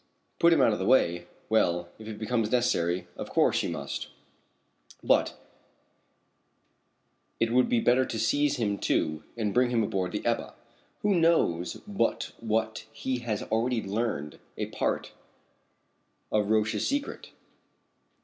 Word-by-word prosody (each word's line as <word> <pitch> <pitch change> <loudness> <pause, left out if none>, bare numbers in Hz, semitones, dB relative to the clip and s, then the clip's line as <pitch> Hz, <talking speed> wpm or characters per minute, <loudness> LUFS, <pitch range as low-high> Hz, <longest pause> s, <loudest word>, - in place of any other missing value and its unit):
"Put 170 - +6
him 160 -4 +5
out 110 - +4
of - - -3
the 95 - -1
way 85 -9 +3 0.2
well, 85 -6 +2
if 110 - -10
it 110 -1 -6
becomes 110 +1 0
absolutely 125 - +5
necessary 90 -7 0
of - - -6
course - - +3
you - - -2
must, - - -4 1.0
but - - +2 2.0
it 115 0 +1
would 125 0 +4
be 120 - +3
better 125 +3 +4
to 115 - -4
seize 145 +6 +2
him 105 -4 -1
too 75 0 0 0.2
and 105 -3 -1
bring 125 0 +3
him 120 -2 +2
aboard 95 -4 -2
the - - -4
Ebba - - -1 0.5
Who 205 -1 +3
knows 165 - +2
but 195 - -1
what 110 -1 -1
he 125 +3 -3
has 115 -4 -3
already 115 +1 0
learned 95 -8 -3 0.2
a - - -1
part - - -2 1.2
of 105 -1 +1
Roch's 110 0 +1
secret?" 285 +1 -3
110 Hz, 145 wpm, -28 LUFS, 100-125 Hz, 2.0 s, Put